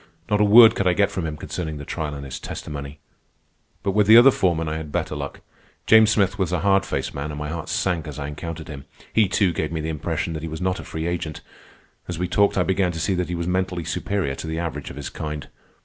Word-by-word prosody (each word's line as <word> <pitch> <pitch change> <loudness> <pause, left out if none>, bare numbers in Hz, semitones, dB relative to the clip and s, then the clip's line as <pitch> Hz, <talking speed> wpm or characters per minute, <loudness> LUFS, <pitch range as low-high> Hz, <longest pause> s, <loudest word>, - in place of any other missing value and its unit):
Not 105 0 +3
a - - +6
word 110 +2 +8
could 100 - 0
I 90 - +4
get 100 +2 +2
from 85 -3 -3
him 75 -1 -5
concerning 80 0 -5
the 75 - -8
trial 75 -2 -4
and 70 0 -7
his 65 - -6
testimony. 70 0 -7 0.9
But 100 - +1
with 105 +1 +2
the 110 +2 +9
other 130 +3 +9
foreman 85 -7 0
I 80 0 -2
had 80 -2 -7
better - - -2
luck. - - -6 0.4
James 110 -1 +7
Smith 100 -1 +1
was 90 -3 0
a 90 -3 0
hard 95 0 +3
faced - - -3
man, 70 +2 -4
and 75 - -6
my 75 0 -4
heart 80 0 -5
sank 85 -4 -1
as 75 - -7
I 70 -1 -4
encountered 80 +2 -6
him. 70 -3 -8 0.3
He, 110 -2 +4
too, 95 -1 +2
gave 80 -1 -2
me 80 - -2
the 80 +1 -3
impression 80 +3 -2
that 80 - -5
he 80 - -5
was 80 - -6
not 90 +1 -1
a - - -7
free 80 0 -5
agent, 85 -3 -3
and - - -33 0.6
as 90 - -4
we 90 +1 -1
talked 100 +3 +2
I 90 - +4
began 95 -1 +1
to 80 - -5
see 95 - 0
that 90 -1 -1
he 90 - -2
was 85 0 -3
mentally 90 -1 -1
superior 95 -2 -2
to - - -6
the 80 0 -3
average 80 -4 -4
of - - -9
his 70 0 -6
kind. 75 -2 -5
85 Hz, 265 wpm, -23 LUFS, 75-95 Hz, 0.9 s, the